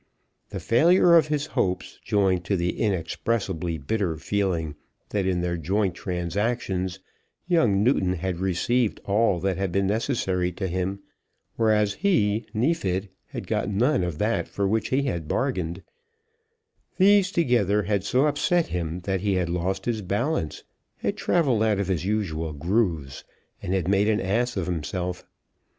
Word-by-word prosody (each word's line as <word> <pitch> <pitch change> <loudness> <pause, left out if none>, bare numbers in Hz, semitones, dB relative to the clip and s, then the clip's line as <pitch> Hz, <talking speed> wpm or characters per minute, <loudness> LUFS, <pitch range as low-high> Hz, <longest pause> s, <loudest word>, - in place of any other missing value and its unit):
The - - -5
failure 170 +8 +4
of 160 -2 +5
his 150 -1 -1
hopes, 95 -11 -2
joined 95 -3 +1
to 100 - +1
the 85 +1 0
inexpressibly 95 -3 -1
bitter 85 +3 -1
feeling 85 -3 -1 0.4
that 100 -3 -1
in 90 -2 +1
their 85 0 -1
joint 95 +3 0
transactions 95 +1 -2 0.5
young 120 - +3
Newton 100 -7 +2
had 90 0 -3
received 100 +6 0
all 100 -2 +2
that 95 -1 0
had 95 -2 -1
been 100 +2 +1
necessary 95 -4 0
to 95 +2 -3
him, 95 +2 -2 0.5
whereas 105 -2 +2
he, 110 - +1
Neefit, 105 - 0 0.2
had - - -7
got - - -1
none 110 +2 +2
of 85 -4 -3
that 110 +6 0
for 100 -1 -1
which 110 +3 0
he 135 +2 +1
had 85 - -3
bargained, 95 - -2 1.1
these 195 0 +5
together 115 - +2
had 100 -2 0
so 125 +8 +2
upset 160 +4 +1
him 85 0 -3
that 95 0 -2
he 100 -1 +1
had 90 -2 0
lost 90 +2 -2
his 115 -3 -1
balance, 100 - -2 0.3
had - - -2
travelled 135 -11 +1
out 110 -2 +2
of 100 -1 -2
his 90 -1 -1
usual 85 -7 -1
grooves, 80 - -1 0.4
and 95 - -1
had 90 -3 -1
made 100 +2 +3
an 110 -1 +2
ass 115 +5 0
of 95 - -1
himself. 90 +1 -3
100 Hz, 155 wpm, -25 LUFS, 90-115 Hz, 1.1 s, of